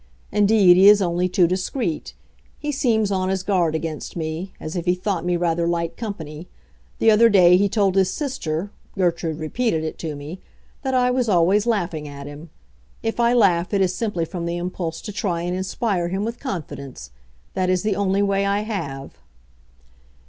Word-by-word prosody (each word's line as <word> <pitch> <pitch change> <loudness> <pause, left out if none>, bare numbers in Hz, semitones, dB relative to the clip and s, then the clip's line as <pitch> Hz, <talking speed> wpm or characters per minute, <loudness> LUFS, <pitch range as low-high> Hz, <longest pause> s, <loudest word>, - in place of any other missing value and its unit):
Indeed, 205 -3 +5
he 195 +2 +8
is 210 0 +7
only 180 -1 0
too 180 0 +3
discreet; 185 - -2 0.4
he 295 0 -3
seems 225 -7 +1
on 185 -1 0
his 190 -1 -1
guard 175 -5 +1
against 160 -1 -5
me—as 160 +1 -5
if 175 -1 -3
he 180 0 +2
thought 185 -1 -2
me 175 0 0
rather 170 -1 0
light 170 -1 -1
company. 170 -7 -7 0.5
The 225 - +4
other 230 +2 +6
day 180 -4 +6
he 200 +2 +3
told 200 -2 +2
his 190 -1 +3
sister—Gertrude 175 - -3
repeated 160 +2 -1
it 155 - -5
to 155 -3 -4
me—that 180 - -7
I 250 0 +3
was 250 -2 0
always 190 +4 +3
laughing 175 -9 -1
at 140 -1 -9
him. 145 +3 -10 0.5
If 225 +1 -2
I 235 0 +4
laugh 190 -5 +3
it 195 - +2
is 185 -1 +2
simply 195 -6 -2
from 170 0 -5
the 170 0 -2
impulse 175 -2 -4
to 210 - -5
try 185 -5 -2
and 175 +1 -2
inspire 190 -1 -1
him 190 +4 -2
with 230 +1 -5
confidence. 140 - -6 0.4
That 185 -1 0
is 185 -1 +1
the 210 -2 0
only 200 0 +1
way 200 0 +1
I 200 +1 +1
have." 140 - -5
185 Hz, 180 wpm, -22 LUFS, 170-205 Hz, 0.5 s, he